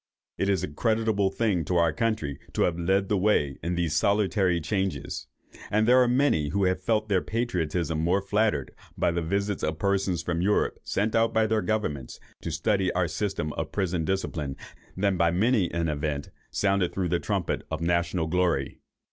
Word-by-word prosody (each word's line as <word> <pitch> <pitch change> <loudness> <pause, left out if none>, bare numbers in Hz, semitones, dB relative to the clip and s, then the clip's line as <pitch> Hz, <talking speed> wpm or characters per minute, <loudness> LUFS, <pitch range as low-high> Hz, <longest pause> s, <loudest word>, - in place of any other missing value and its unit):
It 95 - +1
is 95 -4 +1
a - - -1
creditable 110 +4 +1
thing 95 -3 0
to 90 +3 0
our 85 -2 +3
country 95 -9 -1
to - - +2
have 85 -1 0
led 95 +3 +1
the 100 -1 +1
way 80 -9 +1
in 90 +1 -2
these 85 -3 0
salutary 95 -3 +2
changes; 85 -4 -3 0.4
and 110 +1 +2
there 125 +1 +6
are 125 - +4
many 120 - +2
who 100 +7 0
have 90 0 +1
felt 110 +1 +1
their 95 -3 +2
patriotism 85 -8 -1
more 85 +5 +2
flattered 100 -7 0 0.3
by - - +2
the 85 0 -1
visits 100 +4 -1
of 75 0 -1
persons 95 -2 0
from 85 -1 -1
Europe 105 +3 +1
sent 110 +3 -1
out 115 0 +2
by 110 0 +4
their 110 0 +1
governments 75 - -2 0.2
to - - -4
study 95 +4 +1
our 90 -1 +1
systems 85 -2 -2
of 80 -1 -3
prison 90 -4 -1
discipline, 80 -6 -2 0.4
than 100 -1 +1
by 85 -1 +3
many 100 +1 +2
an 85 -1 -1
event 75 -1 -3 0.2
sounded 100 -3 +1
through 90 -3 0
the 85 0 +1
trumpet 100 -3 -1
of 80 - -3
national 85 0 0
glory. 85 -5 0
90 Hz, 185 wpm, -27 LUFS, 85-105 Hz, 0.4 s, there